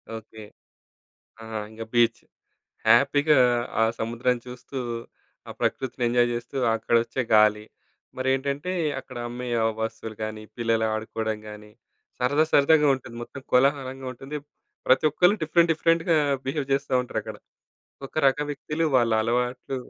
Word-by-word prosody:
Okay. 110 0 -10 1.0
ఆ! - - -9 0.3
ఇంక 110 +1 -9
beach. 120 0 +3 0.7
హ్యాపీగా 140 +5 +5 0.4
ఆ - - +6 0.2
సముద్రం 120 +2 0
చూస్తూ, 125 +2 -9 0.7
ఆ - - -5
ప్రకృతిని 130 -1 -2
ఎంజాయ్ 120 0 +3
చేస్తూ, 120 +3 -5 0.2
అక్కడొచ్చే 115 +3 0
గాలి, 105 0 +5 0.5
మరేంటంటే 140 +5 -1 0.3
అక్కడ 125 - -11
అమ్మే 125 +1 -6 0.2
ఆ - - +2 0.2
వస్తువులు 110 -1 -5
గానీ, 110 0 -5
పిల్లలు 115 -1 +1
ఆడుకోవడం 110 0 -3
గానీ, 105 0 -11 0.5
సరదా, 145 +5 +2
సరదాగా 150 +1 +5
ఉంటుంది. 120 -2 -11
మొత్తం 135 - -10
కోలాహలంగా 135 0 +2
ఉంటుంది. 135 +4 -7 0.5
ప్రతి 130 +3 +4
ఒక్కళ్ళు 180 +7 +4
డిఫరెంట్, 165 +1 +3
డిఫరెంట్‌గా 165 +1 +2 0.3
బిహేవ్ 140 +1 -2
చేస్తా 140 0 -1
ఉంటారక్కడ. 125 - -5 0.7
ఒక - - -22
రకం 145 +2 -1
వ్యక్తులు 150 +3 -2
వాళ్ళ 120 -2 +3
అలవాట్లు 125 +3 -1
125 Hz, 125 wpm, -25 LUFS, 115-140 Hz, 1.0 s, ఆ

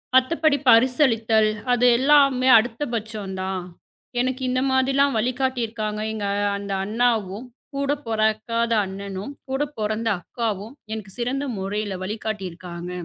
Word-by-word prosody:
மத்தபடி 290 +3 +3
பரிசளித்தல் 230 -3 +4 0.2
அது 245 0 +3
எல்லாமே 270 -1 +4
அடுத்த 225 +3 -1
பட்சம் 215 -3 -5
தான், 190 -1 -3 0.6
எனக்கு 260 +1 -2
இந்த 255 0 +1
மாதிரி 265 +1 +2
ல்லாம் 280 -1 +3
வழிகாட்டி 255 +2 0
இருக்காங்க. 215 -1 -4
எங்க 210 -2 -3 0.3
அந்த 200 0 -6
அண்ணாவும், 220 -1 0 0.3
கூடப் 280 +1 -1
பொறகாத 225 +1 0
அண்ணனும், 195 +4 -6 0.2
கூடப் 290 +2 -2
பொறந்த 215 +1 -1
அக்காவும் 220 +2 -4 0.2
எனக்குச் 210 -2 -7
சிறந்த 265 +4 -1
முறையில 200 +1 -3
வழிகாட்டி 210 0 -4
இருக்காங்க, 175 0 -8
225 Hz, 125 wpm, -23 LUFS, 210-260 Hz, 0.6 s, பரிசளித்தல்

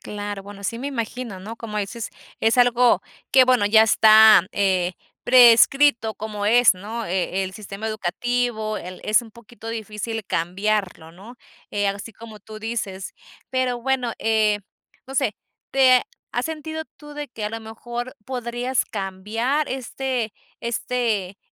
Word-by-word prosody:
Claro, 205 -1 -6
bueno, 200 0 -11
sí 230 +4 -2
me 275 +3 -4
imagino, 235 -4 -5
¿no?, 215 +5 -8
como 215 -2 -5
dices, 210 +2 -4 0.3
es 225 +3 +2
algo 245 0 +4 0.3
que 260 -1 +7
bueno, 250 -5 +3
ya 220 +1 +6
está, 220 -2 +7
eh, 185 -3 +1 0.3
prescrito 245 -1 +6
como 210 0 -5
es, 235 -2 +6
¿no? 220 +5 -6
Eh, 190 +1 -1
el 190 - -6
sistema 210 +1 -7
educativo, 220 +1 -2
el 180 +1 -8
es 215 +3 +3
un 225 - -13
poquito 235 0 -12
difícil 220 0 -5
cambiarlo, 180 -1 -2
¿no?, 215 +8 -13 0.3
eh, 205 0 0
así 200 +3 -4
como 220 -1 -12
tú 215 +1 -10
dices. 210 -4 -4 0.4
Pero 255 -2 0
bueno, 255 -2 0
eh, 215 -2 +2 0.5
no 270 - -9
sé, 265 -7 0 0.3
¿te 260 -2 +5 0.3
has 245 +4 -1
sentido 315 0 -5
tú 295 -1 -12
de 295 -1 -6
que 220 -3 -7
a 210 - -2
lo 225 0 -5
mejor 240 +3 -7
podrías 245 0 -2
cambiar 220 +9 -2
este 255 -3 -3 0.3
este 230 -5 -2
225 Hz, 150 wpm, -23 LUFS, 205-245 Hz, 0.5 s, que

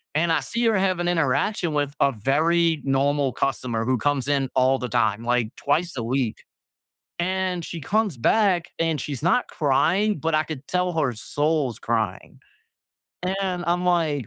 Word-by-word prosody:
And 165 +2 +2
I - - +3
see 235 +1 -3
her 220 -3 +3
have 185 -2 +1
an 175 - -1
interaction 165 +2 0
with 145 -1 -1
a 140 - +4
very 160 +8 +2
normal 140 0 +1
customer 120 -4 -1
who 130 0 +1
comes 140 +1 0
in 135 -2 +1
all 130 +1 +3
the 125 - -3
time, 110 +1 +1
like, 120 -1 0
twice 165 +3 0
a 115 - -2
week. 120 -1 -2 0.8
And 185 0 -1
she 170 - -6
comes 205 - 0
back, 185 - +2
and 165 -3 0
she's 145 0 -5
not 190 +8 +2
crying, 165 +7 +1
but 160 +1 0
I 155 - +2
could 145 -4 -8
tell 180 0 0
her 130 -5 +1
soul's 145 +1 -1
crying. 110 -5 -3 1.0
And 180 -2 -2
I'm, 175 +1 +1
like 160 - +1
150 Hz, 170 wpm, -24 LUFS, 130-175 Hz, 1.0 s, a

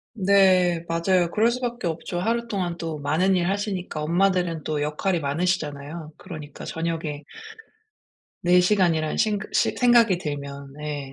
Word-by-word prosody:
네. 185 -4 +4
맞아요. 170 +1 +1
그럴 220 +5 +3
수밖에 240 -3 -3
없죠. 170 +2 -3
하루 235 +5 -1
동안 180 -5 -2
또 165 -2 -5
많은 160 +7 +1
일 175 -1 +1
하시니까 195 -5 -3
엄마들은 175 -1 +1
또 150 -1 -1
역할이 165 +4 -1
많으시잖아요. 150 0 -2
그러니까 155 -6 -9
저녁에 160 -3 -4 1.2
내 180 +1 +5
시간이라는 180 -5 +2
생각 210 -1 0
시 - - +2
생각이 235 -6 +4
들면 140 -3 -6
네 145 -2 -6
175 Hz, 320 characters per minute, -24 LUFS, 155-195 Hz, 1.2 s, 내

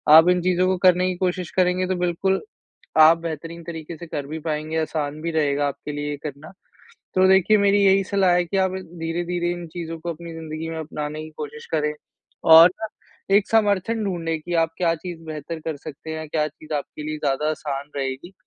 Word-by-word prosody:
आप 160 +3 +8
इन 180 -1 +3
चीज़ों 185 0 +2
को 185 - +1
करने 180 +1 +4
की 185 - -2
कोशिश 180 -2 -1
करेंगे, 185 0 +2
तो 185 - 0
बिल्कुल, 180 +2 0 0.6
आप 160 +2 +8
बेहतरीन 165 +1 -6
तरीके 165 -1 -7
से 170 - -9
कर 145 -3 -4
भी 155 +3 -5
पाएँगे, 155 0 -3
आसान 155 -1 -3
भी 170 - -1
रहेगा 145 -2 +1
आपके 150 +2 -6
लिए 145 0 -3
ये 145 - -3
करना। 150 +3 -7 0.6
तो 185 0 +5
देखिए, 190 +3 +5
मेरी 200 0 +4
यही 195 0 +5
सलाह 190 -2 +2
है 180 0 +3
कि 185 +3 -3
आप 190 -1 +2
धीरे-धीरे 175 0 -3
इन 175 -1 -6
चीज़ों 165 0 -6
को 170 +1 -3
अपनी 170 +1 -9
ज़िंदगी 160 0 -6
में 160 - -4
अपनाने 155 -1 -5
की 155 - -9
कोशिश 150 0 -7
करें। 150 -1 +1 0.5
और 165 +2 +10
ना, 220 - -3 0.5
एक 205 - +2
समर्थन 215 0 +2
ढूँढ़ने 165 -4 -2
कि 175 +3 -5
आप 165 - -1
क्या 170 -2 +2
चीज़ 170 0 -8
बेहतर 155 +1 -6
कर 160 -1 -4
सकते 150 +2 -9
हैं, 155 0 -6
क्या 150 0 0
चीज़ 155 +1 -12
आपके 145 +1 -4
लिए 155 0 -4
ज़्यादा 150 +1 0
आसान 145 -2 -4
रहेगी? 135 +6 -4
165 Hz, 205 wpm, -23 LUFS, 155-180 Hz, 0.6 s, और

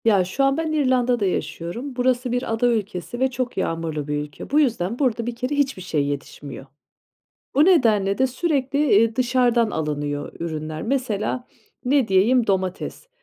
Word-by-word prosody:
Ya, 205 -5 +5
şu 190 +10 -1
an 275 +1 +3
ben 320 -1 -1
İrlanda'da 250 -6 +2
yaşıyorum. 180 - -3
Burası 250 0 +1
bir 245 -2 -1
ada 225 +2 +2
ülkesi 215 -1 -2
ve 265 0 +2
çok 250 0 -3
yağmurlu 160 -3 -2
bir 150 - -1
ülke. 145 -1 -7
Bu 295 - +3
yüzden 230 -6 0
burada 240 -5 +1
bir 240 - -3
kere 255 +4 -2
hiçbir 275 -8 0
şey 155 -5 -1
yetişmiyor. 140 -1 -6 0.9
O 290 - +5
nedenle 215 - +3
de 260 - +4
sürekli, 275 0 -1 0.2
eee, 225 +2 +3
dışarıdan 245 -2 +2
alınıyor 145 -3 -3
ürünler. 155 -1 -4
Mesela, 245 -1 -1 0.4
ne 265 -1 +2
diyeyim, 225 +6 +4
domates. 190 - -2
230 Hz, 160 wpm, -23 LUFS, 180-255 Hz, 0.9 s, Ya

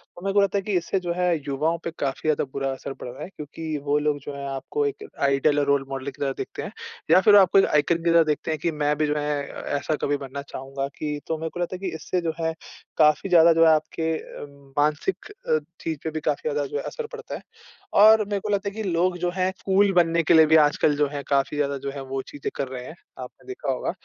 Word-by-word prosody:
तो 175 - -12
मेरे 195 0 -1
को 205 - +5
लगता 200 0 +1
है - - 0
कि 205 - -3
इससे 175 +3 -1
जो 175 -1 -2
है 180 -1 +2
युवाओं 155 +5 0
पे 170 - -3
काफ़ी 140 +2 -2
ज़्यादा 155 - +2
बुरा 135 -1 -1
असर 135 +1 -7
पड़ - - -9
रहा 125 - -8
है। - - -7
क्योंकि 155 -1 -6
वो 145 0 +1
लोग 150 -1 0
जो 140 +1 -8
है 140 0 -6
आपको 400 - -2
एक 425 0 -4
आइडियल 140 +1 +3
और 145 - +1
रोल 140 -1 +2
मॉडल 135 0 -5
की 135 - -17
तरह 135 -1 +1
देखते - - -5
हैं - - -6 0.4
या 185 - +7
फिर 205 0 +6
आपको 195 -1 +6
एक - - +5
आइकॉन 165 +3 +1
की 170 - +2
तरह 165 -1 +6
देखते 155 +1 -1
हैं 155 - -2
कि 170 +1 0
मैं 150 0 +2
भी 155 -1 +1
जो 150 - 0
है 145 -1 -2
अ, - - -8 0.2
ऐसा 155 +2 -1
कभी 145 0 +1
बनना 140 0 -6
चाहूँगा। 135 +1 -4
कि 150 -1 -3
तो 160 - -1
मेरे 160 +1 -4
को 175 - -9
लगता 175 +1 -2
है 180 - -8
कि 160 - -6
इससे 175 +3 -2
जो 165 -1 -2
है 160 0 0 0.4
काफ़ी 155 +4 +4
ज़्यादा 170 -1 +7
जो 165 0 +5
है 160 - +7
आपके 160 +1 -2
अ, - - -9 0.3
मानसिक 150 - 0
अ, 470 +1 -1 0.2
चीज़ 160 -2 -3
पे 160 - -2
भी 155 - -3
काफ़ी 150 +1 -1
ज़्यादा 145 -1 -1
जो 145 - -4
है - - -3
असर 475 - -5
पड़ता 475 0 -8
है। - - -8 0.6
और 215 +1 +8
मेरे 205 0 -2
को 210 - -6
लगता 200 0 0
है - - -14
कि 220 - -3
लोग 175 +1 +1
जो 175 0 -1
हैं 185 0 +1
कूल 195 +1 +4
बनने 170 -1 +3
के - - +4
लिए 160 -1 +8
भी 160 +1 +4
आजकल 150 0 +2
जो 145 0 +2
है 145 0 -5
काफ़ी 140 +1 +1
ज़्यादा 140 -1 0
जो 140 - -2
है 140 -1 -7
वो 135 0 -3
चीज़ें 145 - -5
कर 140 - -2
रहे 125 -1 -7
हैं, 160 - -9 0.2
आपने 125 - -10
देखा 385 +6 -3
होगा। - - -2
155 Hz, 270 wpm, -24 LUFS, 145-180 Hz, 0.6 s, और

